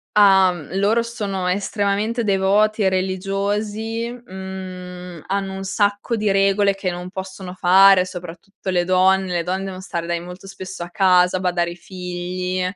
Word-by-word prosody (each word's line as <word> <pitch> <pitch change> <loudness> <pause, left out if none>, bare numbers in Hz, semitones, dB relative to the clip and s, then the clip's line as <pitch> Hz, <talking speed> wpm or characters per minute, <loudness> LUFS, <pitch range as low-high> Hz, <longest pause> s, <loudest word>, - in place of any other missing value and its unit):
Ah, 195 -3 +6
mhmm, 170 0 -9
loro 210 +4 +3
sono 205 -6 -3
estremamente 205 +4 0
devoti 205 +1 +2
religiosi, 205 +5 -2
mhmm, 185 -5 -8
hanno 195 0 -2
un 195 - -5
sacco 205 +3 0
di 215 -2 0
regole 195 0 +3
che 190 -2 -2
non 180 +1 -6
possono 190 -1 -7
fare, 190 +1 +6
soprattutto 180 +2 -8
le 175 -1 +2
donne, 185 0 +3
le 170 - +1
donne 185 +3 -2
devono 190 -1 -6
stare 170 -3 -4
dai 170 0 -1
molto 180 +2 -10
spesso 190 -2 -7
a 175 - -9
casa, 185 -2 +4
badare 175 -2 0
ai - - -8
figli. 180 0 -4
190 Hz, 150 wpm, -21 LUFS, 180-200 Hz, -, Ah